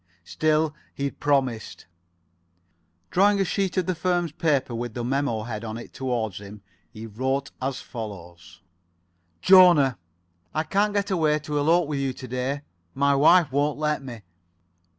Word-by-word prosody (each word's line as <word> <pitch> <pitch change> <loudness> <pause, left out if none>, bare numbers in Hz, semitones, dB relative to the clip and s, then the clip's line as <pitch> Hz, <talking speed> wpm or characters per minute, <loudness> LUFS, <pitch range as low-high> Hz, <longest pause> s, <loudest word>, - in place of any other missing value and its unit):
Still, 155 - 0 0.2
he 140 - -5
had 140 - -3
promised. 130 -6 -1 1.3
Drawing 200 +2 +4
a 195 - +2
sheet 190 +1 -1
of 185 - +2
the 185 - 0
firm's 175 -1 -1
paper 145 -5 0
with 120 -1 -5
the 120 - -3
memo. 125 -3 -1
head 110 -1 -6
on 110 0 -5
it 120 - -10
towards 120 -7 -3
him, 100 0 -11 0.3
he 110 +6 -9
wrote 130 +5 -2
as 130 0 -3
follows: 95 -7 -9 0.8
"Jona: 175 - +6 0.6
I 155 - +1
can't 205 +4 0
get 200 0 0
away 155 -4 +2
to 150 -1 -2
elope 165 +3 +3
with 145 -2 -2
you 135 -1 -1
to 130 - -9
day. 130 +3 -3 0.3
My 140 +1 +3
wife 155 +2 +5
won't 145 +2 0
let 150 -1 -1
me. 120 -5 -9
140 Hz, 155 wpm, -25 LUFS, 120-160 Hz, 1.3 s, Jona